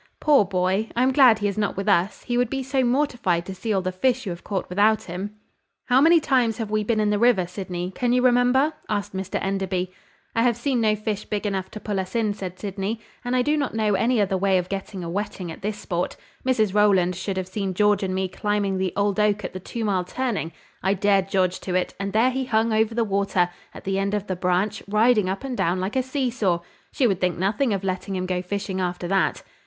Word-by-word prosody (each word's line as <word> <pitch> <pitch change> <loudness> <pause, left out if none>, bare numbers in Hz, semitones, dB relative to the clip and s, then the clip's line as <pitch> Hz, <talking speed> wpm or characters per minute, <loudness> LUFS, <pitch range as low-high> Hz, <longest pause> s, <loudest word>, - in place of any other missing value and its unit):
Poor 290 -6 +5
boy! 190 +3 0
I 240 - +3
am 260 - +3
glad 255 -5 +7
he 205 -1 -1
is 200 +1 -2
not 205 -2 -1
with 195 - -3
us, 195 0 +2
he 240 - -2
would 245 -1 +2
be 270 +1 -2
so 265 0 0
mortified 240 -9 +1
to 190 - -6
see 220 +4 -4
all 190 -3 +1
the 185 - -1
fish 255 +7 0
you 190 - -3
have 170 - -8
caught 195 -3 -3
without 210 +4 +3
him!" 190 +4 -6 0.5
"How 250 +2 +5
many 330 +3 +6
times 250 -7 +1
have 225 -3 -4
we 215 0 +1
been 220 +1 0
in 210 -1 +2
the 205 - +1
river, 235 -6 +4
Sydney? 180 0 -5
Can 240 +5 -1
you 250 0 +3
remember?" 255 +4 +4 0.2
asked 205 -1 -2
Mr 190 0 -2
Enderby. 190 -2 -1 0.4
"I 230 - +3
have 235 -1 +2
seen 250 -1 0
no 215 -1 +3
fish 215 -1 -3
big 210 0 -3
enough 190 -2 -2
to 215 - -8
pull 205 -2 -2
us 190 +4 -5
in," 220 -3 +1
said 185 -3 -7
Sydney; 200 +3 -3 0.2
"and 245 +1 -1
I 250 - +3
do 295 +4 +2
not 285 -6 -2
know 215 -2 +1
any 230 +4 +2
other 195 -2 +1
way 195 0 +3
of 180 0 -2
getting 195 -1 -5
a - - -5
wetting 185 -1 -4
at - - -10
this 210 +1 -3
sport. 175 -3 -3 0.3
Mrs 220 -7 +1
Rowland 195 -4 +3
should 190 +1 -3
have 185 -1 -2
seen 190 -1 -3
George 210 +1 +3
and 185 -1 -1
me 190 0 0
climbing 200 0 -1
the 190 -1 -1
old 200 0 +1
oak 210 -1 +2
at - - -5
the 185 - -5
two 225 +4 -5
mile 190 -3 +1
turning. 215 -4 -2 0.3
I 190 +2 +2
dared 195 -1 +2
George 185 -2 +1
to 180 - -4
it, 185 - 0
and 195 0 -2
there 230 +5 +3
he 265 +1 -2
hung 225 -1 +1
over 220 +1 +1
the 235 - +2
water, 195 -4 +1 0.2
at - - -11
the 195 0 -1
end 200 +1 0
of 205 -1 -2
the 185 - -2
branch, 180 +3 0
riding 210 -1 +3
up 195 +6 -3
and 265 -2 -3
down 175 -3 0
like 190 +5 -3
a 260 - +3
see 260 -1 -1
saw. 190 -8 0 0.3
She 265 - +1
would 195 -6 +1
think 180 -1 +1
nothing 205 +8 +1
of 195 -1 -1
letting 190 +1 -3
him 185 0 -2
go 185 -1 -1
fishing 190 0 -3
after 180 -1 -2
that." 195 +1 +1
205 Hz, 250 wpm, -24 LUFS, 185-230 Hz, 0.5 s, glad